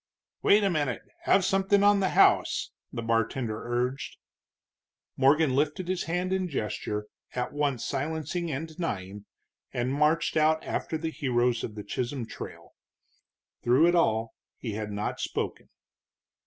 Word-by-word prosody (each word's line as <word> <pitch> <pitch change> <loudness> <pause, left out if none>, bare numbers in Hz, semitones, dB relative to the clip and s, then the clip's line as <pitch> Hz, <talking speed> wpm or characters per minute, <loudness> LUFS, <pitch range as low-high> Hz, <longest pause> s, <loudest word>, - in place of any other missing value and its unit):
"Wait 210 +1 +5
a 200 - +3
minute 145 -7 -1 0.2
have 195 -2 +4
something 195 +1 +3
on 205 0 +6
the 190 -1 +2
house," - - +4 0.2
the 115 - -4
bartender 115 0 0
urged. 125 +3 -2 1.0
Morgan 140 +1 +4
lifted 150 +6 0
his 185 -1 -1
hand 180 +3 -1
in 190 -1 0
gesture 105 -5 -3 0.3
at 125 0 -2
once 145 -5 0
silencing 160 +5 -2
and 155 +3 -3
denying, 105 - -5 0.5
and 125 +2 -1
marched 150 +3 +2
out 155 0 +3
after 160 - -2
the 160 +1 -3
heroes 120 -4 +1
of 105 - -5
the 105 - -6
Chisholm 125 +3 -3
Trail. - - -9 0.9
Through 130 +7 +5
it - - +2
all 115 -10 +2 0.2
he 115 - -5
had 105 0 -4
not 105 +1 -3
spoken. - - -3
140 Hz, 140 wpm, -28 LUFS, 120-165 Hz, 1.0 s, on